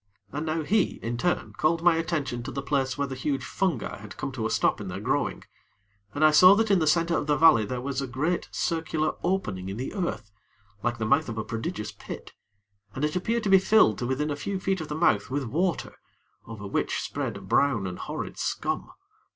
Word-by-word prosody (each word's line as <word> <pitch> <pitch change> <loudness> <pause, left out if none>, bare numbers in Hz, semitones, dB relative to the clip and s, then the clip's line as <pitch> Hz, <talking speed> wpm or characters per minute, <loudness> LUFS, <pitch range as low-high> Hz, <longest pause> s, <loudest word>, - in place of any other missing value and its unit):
And 150 +3 -4
now, 155 0 -1
he, 205 +4 +2
in 115 +1 -2
turn, 175 +9 -1
called 165 +2 +1
my 175 -1 +6
attention 155 -7 -2
to - - -6
the 140 - -4
place 135 -2 0
where 140 - 0
the 135 - -6
huge 135 +1 -2
fungi 180 - -1
had 105 0 -11
come 135 - -3
to 115 -4 -2
a - - -5
stop - - +1
in 100 - -6
their 90 +1 -5
growing, 105 - -1 0.7
and 155 +2 +4
I 155 - +7
saw 185 +6 +8
that 220 0 +1
in 195 - +5
the 160 - +1
center 170 +2 +3
of 145 - -1
the 150 - +3
valley 155 -9 +6
there 125 +3 -4
was 140 +1 -2
a 135 - -3
great 145 +8 -1
circular 160 -2 -1
opening 105 - -1
in 100 - -5
the 130 - -4
earth, 120 - -3 0.5
like 120 +1 0
to - - -15
the - - +1
mouth 140 +6 +2
of 115 - -5
a 110 - -1
prodigious 115 +1 -4
pit, - - -9 0.6
and 135 - 0
it 150 - -2
appeared 225 +6 0
to 205 - 0
be 190 - +8
filled 190 - +4
to 120 - -2
within 145 +4 -1
a - - -1
few 190 +7 -3
feet 190 -1 -1
of 160 - -5
the 150 - -4
mouth 130 -11 +2
with 140 +2 -1
water, 165 +8 -1 0.5
over 105 -2 -8
which 100 - -1
spread - - -3
a - - -10
brown 130 -8 +2
and 90 -1 -5
horrid - - -5
scum. - - -2
145 Hz, 230 wpm, -27 LUFS, 120-170 Hz, 0.7 s, saw